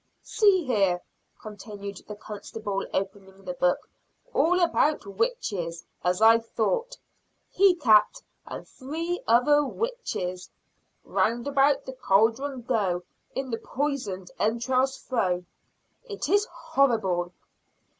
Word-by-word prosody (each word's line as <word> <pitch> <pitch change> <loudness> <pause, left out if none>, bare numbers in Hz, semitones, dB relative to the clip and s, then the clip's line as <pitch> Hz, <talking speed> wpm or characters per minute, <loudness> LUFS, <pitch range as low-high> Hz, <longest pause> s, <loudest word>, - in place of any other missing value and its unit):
"See 390 -6 +3
here!" 195 -8 +2 0.4
continued 205 -2 -8
the 210 - -6
constable, 205 -1 -5
opening 195 0 -5
the 180 - -3
book, 180 0 +1 0.5
"All 360 +3 +3
about 320 -6 +2
witches, 200 - -2 0.2
as 180 +4 +1
I 225 +1 +8
thought! 465 - -2 0.5
He 385 -1 +5
cat 235 - +4 0.3
and - - -7
three 330 +6 -4
other 270 +6 +5
witches! 270 - -4 0.5
'Round 235 +1 0
about 280 0 +3
the 260 - -6
cauldron 250 +3 +1
go: 200 -8 0 0.3
In 265 -1 -3
the 230 - -2
poisoned 245 -10 -3
entrails 255 +5 +1
throw.' 180 -8 -1 0.6
It 410 -9 -4
is 410 +5 +3
horrible!" 195 -10 +1
230 Hz, 110 wpm, -26 LUFS, 195-290 Hz, 0.6 s, I